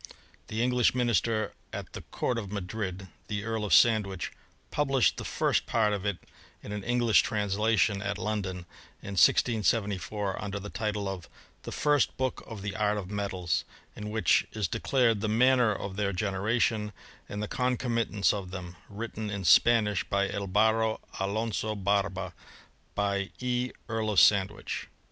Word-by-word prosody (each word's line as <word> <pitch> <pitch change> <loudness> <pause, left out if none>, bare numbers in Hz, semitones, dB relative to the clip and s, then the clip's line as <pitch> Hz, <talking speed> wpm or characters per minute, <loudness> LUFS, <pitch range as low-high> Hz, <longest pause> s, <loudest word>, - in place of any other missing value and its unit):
The 110 +2 -1
English 125 -1 +3
minister 115 -2 +1 0.2
at - - -7
the - - -6
Court 120 -2 -2
of 100 -3 -7
Madrid, 95 -1 -4 0.2
the 105 -1 -3
Earl 110 -1 -2
of 105 - -3
Sandwich, 105 -6 +4 0.4
published 135 -4 +2
the - - -4
first - - 0
P^rt 110 -2 +2
of 100 0 -2
it 100 -3 -1 0.5
in - - -7
an 105 -1 -4
English 120 -1 +4
translation 105 -1 +1
at 100 -1 -2
London, 100 -5 -3 0.4
in - - -7
1674, 105 -1 +2
under 100 0 -3
the 105 +1 -8
title 105 -2 -2
of 95 -3 -6 0.3
The - - -7
First 145 -3 +2
Book 130 -1 -2
of 110 -4 -8
the 100 -1 -4
Art 105 -1 +1
^ 95 -3 -5
Metals, 95 -4 -1 0.3
in 105 0 -6
which 105 -4 +2
is 110 -2 -1
declared 115 -2 +1
the 110 - 0
manner 125 +1 +4
of 100 -1 -5
their 100 -1 0
S^Deration, 105 +3 0 0.4
and 105 +1 -4
the - - -2
concomitants 115 -5 +1
of 100 -3 -4
them, 90 -2 -7
written 110 0 -5
iQ 100 -2 -4
Spanish 105 +4 +5
by 100 0 0
Albaro 110 +3 +1 0.2
Alonzo 110 +2 -1
Barba. 95 -2 0 0.6
By 100 -1 0
E. 125 0 -1 0.2
Earl 110 -1 -1
of 105 -4 +4
Sandwich.'' 100 0 +2
105 Hz, 155 wpm, -29 LUFS, 100-115 Hz, 0.6 s, Spanish